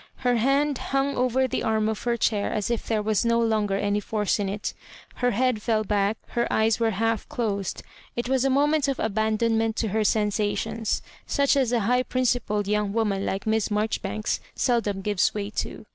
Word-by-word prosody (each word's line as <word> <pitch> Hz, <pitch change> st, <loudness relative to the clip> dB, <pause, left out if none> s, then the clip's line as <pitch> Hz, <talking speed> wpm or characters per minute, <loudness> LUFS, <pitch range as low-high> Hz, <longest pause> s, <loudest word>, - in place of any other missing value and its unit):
Her 245 Hz, -1 st, +3 dB
hand 275 Hz, +3 st, +2 dB
hung 275 Hz, +1 st, 0 dB
over 255 Hz, +1 st, +2 dB
the -, -, -2 dB
arm 220 Hz, -1 st, +1 dB
of 220 Hz, -1 st, -2 dB
her 240 Hz, -1 st, +1 dB
chair 210 Hz, -2 st, +1 dB
as 210 Hz, +2 st, -1 dB
if 235 Hz, -, -2 dB
there 215 Hz, -2 st, 0 dB
was 215 Hz, +1 st, +1 dB
no 235 Hz, 0 st, +2 dB
longer 215 Hz, -3 st, +1 dB
any 205 Hz, +1 st, 0 dB
force 210 Hz, 0 st, -1 dB
in 200 Hz, -1 st, -1 dB
it 205 Hz, +2 st, -3 dB, 0.4 s
Her 245 Hz, -, +2 dB
head 245 Hz, -1 st, +1 dB
feU 220 Hz, -1 st, +1 dB
back, 205 Hz, +1 st, +1 dB
her 235 Hz, 0 st, -1 dB
eyes 220 Hz, 0 st, +2 dB
were 230 Hz, -1 st, +2 dB
half 225 Hz, 0 st, 0 dB
closed; 200 Hz, -5 st, -2 dB, 0.3 s
it 240 Hz, 0 st, -2 dB
was 265 Hz, -1 st, +2 dB
a 270 Hz, -, +2 dB
mo 275 Hz, +2 st, +3 dB
ment 295 Hz, -1 st, +1 dB
of 275 Hz, -, -1 dB
abandonment 220 Hz, +1 st, +1 dB
to 225 Hz, -, -1 dB
her 220 Hz, +3 st, 0 dB
sensationfs 215 Hz, +1 st, 0 dB, 0.2 s
such 280 Hz, 0 st, +2 dB
as 260 Hz, -4 st, +2 dB
a 240 Hz, -2 st, +2 dB
high 250 Hz, +5 st, +2 dB
principled 245 Hz, -5 st, 0 dB
young 210 Hz, -1 st, 0 dB
woman 210 Hz, -3 st, 0 dB
like 195 Hz, +1 st, -2 dB
Miss 220 Hz, -1 st, +1 dB
Mar 210 Hz, +1 st, +1 dB
joribanks 215 Hz, -1 st, -2 dB, 0.2 s
seldom 215 Hz, -6 st, 0 dB
gives 205 Hz, -1 st, +1 dB
way 205 Hz, 0 st, -3 dB
to. 215 Hz, -, -4 dB
220 Hz, 200 wpm, -25 LUFS, 210-245 Hz, 0.4 s, Her